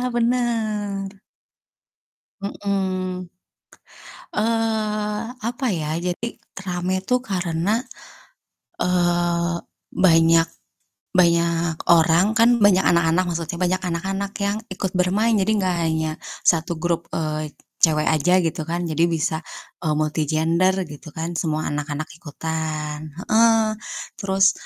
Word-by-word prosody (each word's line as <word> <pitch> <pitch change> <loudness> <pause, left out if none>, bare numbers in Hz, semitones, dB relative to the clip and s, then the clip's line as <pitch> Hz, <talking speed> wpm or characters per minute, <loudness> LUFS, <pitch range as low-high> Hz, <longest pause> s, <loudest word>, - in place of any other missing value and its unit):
bener. 215 -5 -1 1.2
Mhm. 185 -3 -2 1.1
Eee, 215 -1 0 0.3
apa 245 +2 -3
ya, 155 -4 -2
jadi 180 +6 -2 0.4
rame 180 +1 -1
tuh 250 0 +2
karena, 175 -5 -1 1.1
eee, 175 -1 +1 0.4
banyak 165 -2 +5 0.7
banyak 170 -2 +2
orang 170 +5 +5
kan 235 0 +5
banyak 195 -2 +5
anak-anak 170 +1 +3
maksudnya, 165 0 -3
banyak 180 +1 0
anak-anak 195 +4 -2
yang 205 +2 0
ikut 190 0 -3
bermain 190 +5 +2
jadi 210 +3 +2
enggak 185 -3 +1
hanya 160 0 0 0.3
satu 170 0 +2
grup, 170 +1 -1
eee, 155 -1 -2 0.3
cewek 155 -2 +4
aja 160 +4 +3
gitu 160 -1 -2
kan 175 +1 -1
jadi 165 +1 +1
bisa, 160 -1 -1 0.4
eee, 155 -3 0
multi 155 0 0
gender 165 +4 +2
gitu 150 0 -11
kan 165 +2 -3
semua 155 -3 -1
anak-anak 150 +1 -3 0.2
ikutan, 155 -1 -4
heeh, 225 +3 +4 0.5
terus, 195 0 +4
175 Hz, 105 wpm, -22 LUFS, 160-200 Hz, 1.2 s, banyak